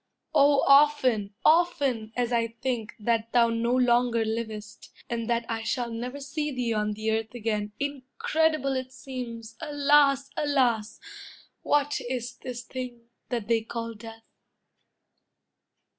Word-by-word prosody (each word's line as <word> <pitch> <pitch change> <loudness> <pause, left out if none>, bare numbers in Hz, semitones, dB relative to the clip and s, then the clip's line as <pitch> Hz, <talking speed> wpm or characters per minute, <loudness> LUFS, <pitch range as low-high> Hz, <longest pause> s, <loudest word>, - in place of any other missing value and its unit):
Oh, 285 0 +5
often, 270 -8 +4
often 285 -9 +3
as 245 -1 0
I 230 -1 +2
think 230 -1 -4
That 230 +1 0
thou 235 -1 +5
no 230 +1 0
longer 240 -2 +3
livest, 220 -1 -5 0.2
and 230 -1 -2
that 235 0 +1
I 225 -1 -2
Shall 235 +1 -2
never 250 +4 -5
see 295 +2 -3
thee 245 -3 -1
on 210 -1 0
the 220 +1 -2
earth 220 +2 -2
again, 210 -3 -2
Incredible 285 +1 0
it 260 0 -4
seems! 240 -4 -7
Alas, 285 -1 +3
alas! 245 -7 +1 0.6
What 290 0 +1
is 245 -1 -4
this 245 -2 -6
thing, 245 -3 -7 0.2
that 235 -4 -2
they 230 -1 +2
call 230 +1 -5
death? 225 +1 -11
240 Hz, 130 wpm, -27 LUFS, 225-275 Hz, 0.6 s, Oh